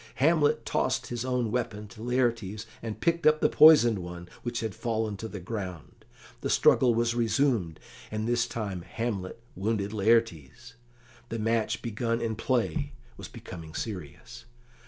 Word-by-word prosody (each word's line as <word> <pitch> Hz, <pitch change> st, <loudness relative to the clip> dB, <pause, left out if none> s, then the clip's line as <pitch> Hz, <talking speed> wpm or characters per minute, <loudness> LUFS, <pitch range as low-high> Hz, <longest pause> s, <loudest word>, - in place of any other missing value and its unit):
Hamlet 150 Hz, +2 st, +3 dB
tossed -, -, 0 dB
his 120 Hz, -1 st, -3 dB
own 125 Hz, -3 st, -1 dB
weapon 110 Hz, -3 st, -3 dB
to 110 Hz, -, -13 dB
Laertes, 115 Hz, -4 st, -1 dB, 0.2 s
and 115 Hz, -2 st, -5 dB
picked 170 Hz, -1 st, +2 dB
up 155 Hz, 0 st, +5 dB
the -, -, +4 dB
poisoned 145 Hz, -9 st, +7 dB
one 90 Hz, 0 st, -8 dB
which 120 Hz, -2 st, -3 dB
had 110 Hz, -3 st, -3 dB
fallen 110 Hz, 0 st, -2 dB
to 110 Hz, +3 st, -6 dB
the 105 Hz, -2 st, -7 dB
ground. 95 Hz, -4 st, -7 dB, 0.3 s
The -, -, -3 dB
struggle 125 Hz, -3 st, +4 dB
was 115 Hz, 0 st, +1 dB
resumed, 115 Hz, -, +1 dB, 0.3 s
and 110 Hz, +1 st, -3 dB
this 120 Hz, 0 st, +1 dB
time 100 Hz, -7 st, -4 dB
Hamlet 105 Hz, 0 st, -4 dB, 0.2 s
wounded 105 Hz, +1 st, -1 dB
Laertes. 115 Hz, -, 0 dB, 0.6 s
The 115 Hz, -, -3 dB
match 115 Hz, 0 st, 0 dB
begun 115 Hz, +1 st, -1 dB
in 115 Hz, -2 st, -2 dB
play 135 Hz, +5 st, -1 dB, 0.2 s
was -, -, -9 dB
becoming 85 Hz, -9 st, -10 dB
serious. 110 Hz, +4 st, -7 dB
115 Hz, 150 wpm, -28 LUFS, 105-120 Hz, 0.6 s, poisoned